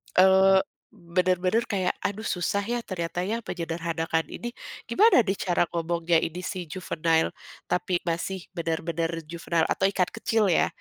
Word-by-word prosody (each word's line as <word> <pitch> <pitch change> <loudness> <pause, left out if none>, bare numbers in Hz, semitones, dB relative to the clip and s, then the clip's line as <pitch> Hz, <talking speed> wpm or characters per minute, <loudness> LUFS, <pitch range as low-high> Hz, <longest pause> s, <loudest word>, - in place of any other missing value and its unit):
eee, 190 +1 +6 0.3
bener-bener 180 +5 +1
kayak, 185 -2 0
"Aduh 215 +2 -2
susah 180 +3 0
ya 240 0 0
ternyata 175 -2 -3
ya 220 +5 -1
menyederhanakan 165 -1 -2
ini 240 - -6 0.4
gimana 420 - +6
nih 195 -1 -1
cara 175 -2 +2
ngomongnya 170 0 +1
ini 175 +3 -4
si 180 -3 -4
juvenile 165 -1 0 0.4
tapi 180 0 0
masih 175 +2 -2
bener-bener" 165 -1 -2 0.2
juvenile 170 -1 0
atau 190 - +2
ikan 190 -2 +1
kecil 225 -3 +1
ya, - - +3
180 Hz, 140 wpm, -26 LUFS, 170-190 Hz, 0.4 s, eee